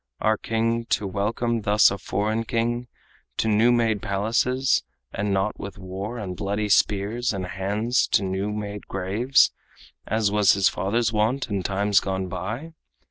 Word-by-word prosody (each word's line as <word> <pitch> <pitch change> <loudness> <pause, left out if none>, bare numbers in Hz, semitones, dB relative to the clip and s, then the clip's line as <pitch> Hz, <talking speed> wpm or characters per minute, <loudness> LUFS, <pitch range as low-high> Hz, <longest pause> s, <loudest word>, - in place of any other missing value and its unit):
Our 110 0 +2
king 115 +1 -1
to 105 - 0
welcome 110 +4 -1
thus 105 -1 +5
a 100 - -4
foreign 105 +4 -1
king 120 +1 -1 0.5
To - - +1
new 110 +3 +4
made 115 -4 +2
palaces, 115 - +1 0.3
and 100 0 -1
not 95 +2 0
with 100 0 -7
war 95 +5 -6
And 95 -5 -5
bloody 105 +3 -2
spears 105 +5 +2
and 95 -2 -3
hands 100 +7 0
to - - +4
new 95 +2 -2
made 105 -1 -5
graves, 100 +8 +2 0.6
As 110 -1 +1
was 105 -2 +5
his 100 -1 +3
father's 115 +4 0
wont 110 +4 0
in 100 -1 0
times 100 +2 +2
gone 95 -1 -3
by?" 110 - -5
105 Hz, 155 wpm, -24 LUFS, 100-115 Hz, 0.6 s, thus